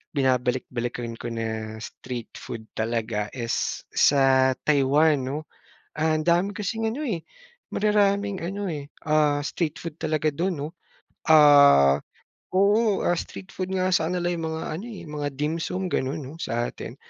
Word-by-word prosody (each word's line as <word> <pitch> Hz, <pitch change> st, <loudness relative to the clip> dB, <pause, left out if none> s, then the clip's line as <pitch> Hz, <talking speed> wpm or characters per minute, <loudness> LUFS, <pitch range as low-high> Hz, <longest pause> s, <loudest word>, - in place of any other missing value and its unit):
binabalik-balikan 125 Hz, -2 st, -1 dB
ko 120 Hz, -, -5 dB
na 110 Hz, -1 st, -4 dB
street 125 Hz, -3 st, -7 dB
food 110 Hz, -, -7 dB
talaga 110 Hz, -2 st, -2 dB
is 115 Hz, -2 st, -2 dB
sa 130 Hz, -2 st, +4 dB
Taiwan 145 Hz, +1 st, +4 dB
'no. 150 Hz, +3 st, -3 dB, 0.5 s
Ah, 155 Hz, 0 st, +2 dB
dami 175 Hz, +5 st, +2 dB
kasing 225 Hz, +1 st, -3 dB
ano 295 Hz, -, -5 dB
eh, 170 Hz, -6 st, -3 dB, 0.5 s
mararaming 205 Hz, -1 st, +2 dB
ano 200 Hz, +1 st, -3 dB
eh, 145 Hz, -3 st, -4 dB, 0.2 s
ah, 150 Hz, -1 st, +3 dB
street 155 Hz, +1 st, -3 dB
food 165 Hz, -2 st, -7 dB
talaga 155 Hz, -1 st, 0 dB
dun 165 Hz, +1 st, -2 dB
'no. 150 Hz, -, -2 dB, 0.6 s
Ah, 140 Hz, -, +7 dB, 0.6 s
oo 205 Hz, +1 st, +3 dB
ah, -, -, +3 dB
street 190 Hz, +3 st, -7 dB
food 185 Hz, 0 st, -4 dB
nga 185 Hz, 0 st, +1 dB
sakanila 175 Hz, +1 st, +1 dB
yung 165 Hz, -1 st, -3 dB
mga 160 Hz, -, -4 dB
ano 180 Hz, +8 st, -5 dB
eh, 220 Hz, -, -8 dB
mga 150 Hz, -2 st, -3 dB
dimsum 165 Hz, +5 st, -2 dB
ganun 140 Hz, +2 st, -2 dB
sa 120 Hz, +1 st, -1 dB
atin, -, -, -8 dB
150 Hz, 140 wpm, -25 LUFS, 130-180 Hz, 0.6 s, Ah